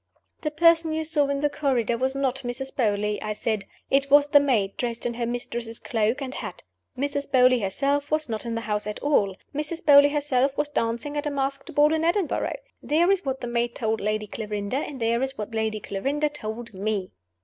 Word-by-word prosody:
"The 305 Hz, -, -1 dB
person 330 Hz, +1 st, +4 dB
you 320 Hz, 0 st, -1 dB
saw 305 Hz, -2 st, +2 dB
in 280 Hz, 0 st, -1 dB
the 295 Hz, -, +2 dB
corridor 260 Hz, -6 st, 0 dB
was 260 Hz, +3 st, -1 dB
not 265 Hz, -2 st, 0 dB
Mrs. 265 Hz, +1 st, -5 dB
Beauly," 210 Hz, -3 st, 0 dB
I 215 Hz, 0 st, -2 dB
said. 210 Hz, -1 st, -2 dB, 0.3 s
"It 275 Hz, +1 st, +3 dB
was 285 Hz, +1 st, +7 dB
the 290 Hz, -, +7 dB
maid, 225 Hz, -9 st, +1 dB
dressed 235 Hz, -1 st, -3 dB
in 240 Hz, -, -1 dB
her 235 Hz, 0 st, -2 dB
mistress's 235 Hz, -1 st, -4 dB
cloak 225 Hz, +4 st, 0 dB
and 260 Hz, -1 st, -5 dB
hat. -, -, -7 dB, 0.3 s
Mrs. 285 Hz, +1 st, -2 dB
Beauly 255 Hz, -1 st, +5 dB
herself 280 Hz, +8 st, 0 dB
was 310 Hz, 0 st, +1 dB
not 220 Hz, -2 st, -3 dB
in 230 Hz, -1 st, -3 dB
the 230 Hz, -, -2 dB
house 210 Hz, -1 st, -2 dB
at 210 Hz, -, -4 dB
all. 205 Hz, -10 st, +2 dB, 0.2 s
Mrs. 305 Hz, +4 st, -4 dB
Beauly 285 Hz, -1 st, +8 dB
herself 280 Hz, -2 st, +1 dB
was 295 Hz, 0 st, 0 dB
dancing 235 Hz, +3 st, -2 dB
at 290 Hz, -, -1 dB
a -, -, +1 dB
masked 275 Hz, -1 st, -3 dB
ball 295 Hz, +1 st, +5 dB
in 320 Hz, 0 st, 0 dB
Edinburgh. 345 Hz, +6 st, 0 dB, 0.2 s
There 335 Hz, +5 st, +3 dB
is 390 Hz, -1 st, +1 dB
what 265 Hz, -1 st, -2 dB
the 245 Hz, -, -4 dB
maid 235 Hz, 0 st, -1 dB
told 220 Hz, -1 st, -1 dB
Lady 210 Hz, +1 st, -1 dB
Clarinda; 210 Hz, +2 st, -3 dB
and 280 Hz, -1 st, -4 dB
there 230 Hz, +1 st, +1 dB
is 265 Hz, 0 st, -2 dB
what 210 Hz, +2 st, -5 dB
Lady 220 Hz, -1 st, -1 dB
Clarinda 275 Hz, +10 st, -1 dB
told 235 Hz, -4 st, -6 dB
_me. 200 Hz, -1 st, -2 dB
260 Hz, 210 wpm, -25 LUFS, 225-290 Hz, 0.3 s, Beauly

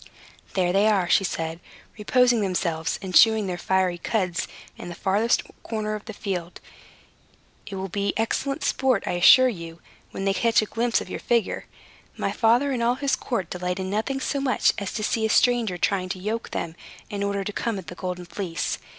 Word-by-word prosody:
"There 180 Hz, -2 st, +2 dB
they 200 Hz, +2 st, +4 dB
are," 195 Hz, -5 st, +2 dB
said 165 Hz, -3 st, +1 dB
she, -, -, -22 dB
"reposing 245 Hz, +1 st, +3 dB
themselves 170 Hz, -4 st, -1 dB
and 185 Hz, -1 st, -5 dB
chewing 220 Hz, +1 st, +6 dB
their 185 Hz, -2 st, -2 dB
fiery 185 Hz, -2 st, +1 dB
cuds 185 Hz, -3 st, -1 dB, 0.3 s
in -, -, -8 dB
that 170 Hz, -, -8 dB
farthest 210 Hz, +5 st, +2 dB, 0.2 s
corner 215 Hz, -1 st, -3 dB
of 210 Hz, -1 st, -6 dB
the 220 Hz, -, -7 dB
field. 180 Hz, -4 st, -4 dB, 1.1 s
It 200 Hz, -, -6 dB
will 190 Hz, 0 st, -3 dB
be 200 Hz, +2 st, -1 dB
excellent 275 Hz, +6 st, -1 dB
sport, 265 Hz, -1 st, +1 dB
I -, -, -1 dB
assure 220 Hz, +9 st, +7 dB
you, 170 Hz, -7 st, -6 dB, 0.3 s
when 195 Hz, -, -5 dB
they 195 Hz, -, +2 dB
catch 230 Hz, +4 st, +3 dB
a 215 Hz, -, +2 dB
glimpse 230 Hz, +2 st, 0 dB
of -, -, -8 dB
your -, -, -4 dB
figure. 235 Hz, -4 st, 0 dB, 0.5 s
My -, -, -1 dB
father 245 Hz, +5 st, +3 dB
and 250 Hz, -3 st, -1 dB
all 240 Hz, +1 st, +2 dB
his 280 Hz, +1 st, 0 dB
court 235 Hz, -8 st, -3 dB
delight 180 Hz, +1 st, -3 dB
in 190 Hz, 0 st, -3 dB
nothing 225 Hz, +6 st, -1 dB
so 280 Hz, +1 st, -2 dB
much 270 Hz, -2 st, +2 dB
as 200 Hz, -2 st, -4 dB
to 215 Hz, -, -3 dB
see 220 Hz, +1 st, 0 dB
a 220 Hz, -, +2 dB
stranger 235 Hz, -5 st, +3 dB
trying 185 Hz, 0 st, 0 dB
to 185 Hz, -, -4 dB
yoke 220 Hz, +4 st, -3 dB
them, 165 Hz, -1 st, -4 dB, 0.4 s
in 200 Hz, -1 st, -3 dB
order 200 Hz, 0 st, -1 dB
to 205 Hz, -, -5 dB
come 230 Hz, -1 st, -2 dB
at 190 Hz, -, -7 dB
the -, -, -8 dB
Golden 180 Hz, 0 st, -5 dB
Fleece. 170 Hz, -2 st, -3 dB
200 Hz, 200 wpm, -25 LUFS, 180-230 Hz, 1.1 s, assure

